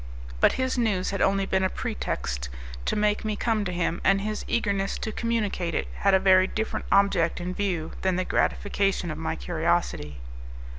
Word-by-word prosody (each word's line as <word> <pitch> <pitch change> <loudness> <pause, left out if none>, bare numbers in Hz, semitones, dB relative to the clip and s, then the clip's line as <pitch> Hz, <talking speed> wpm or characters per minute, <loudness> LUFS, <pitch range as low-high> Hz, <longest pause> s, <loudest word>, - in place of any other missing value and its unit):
But - - +5
his 260 -1 -1
news 200 -6 +1
had 195 - -2
only 195 0 +2
been 190 0 +1
a 190 - +2
pretext - - -3 0.4
to - - 0
make 210 0 +1
me 215 -1 -1
come 220 0 0
to 180 - -2
him, 175 -1 -1
and 195 +1 +4
his 215 +1 -3
eagerness 200 -4 0
to 220 - -4
communicate 210 -7 -1
it - - -1
had 195 -1 +4
a - - +5
very 185 0 +5
different 220 +2 -3
object 195 -4 +3
in 180 +1 -3
view 180 -5 -2
than 190 -1 +1
the 185 0 0
gratification 195 -4 0
of 155 - -5
my 160 0 -2
curiosity. 165 - -1
190 Hz, 185 wpm, -26 LUFS, 175-205 Hz, 0.4 s, But